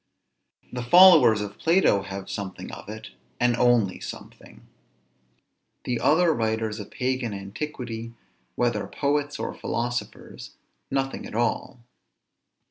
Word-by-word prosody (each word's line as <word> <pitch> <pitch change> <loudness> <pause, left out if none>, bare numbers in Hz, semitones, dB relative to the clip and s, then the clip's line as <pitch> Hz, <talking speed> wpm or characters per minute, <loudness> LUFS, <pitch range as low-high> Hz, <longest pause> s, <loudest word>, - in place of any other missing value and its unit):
The 125 - -3
followers 130 - +7
of 105 0 -7
Plato 165 - +3
have 95 0 -7
something 95 -2 -6
of - - -10
it, 110 0 -8 0.3
and 120 -1 +3
only 120 -6 +2
something; - - -11 1.2
the 120 -2 -2
other 165 +1 +3
writers 110 -2 -2
of 105 - -8
pagan 130 -4 -2
antiquity, 115 +2 -6 0.4
whether 120 -1 0
poets 145 0 -1
or - - -4
philosophers, 120 +1 -5 0.3
nothing 135 0 -2
at - - -10
all. 120 +1 -1
120 Hz, 115 wpm, -25 LUFS, 110-135 Hz, 1.2 s, followers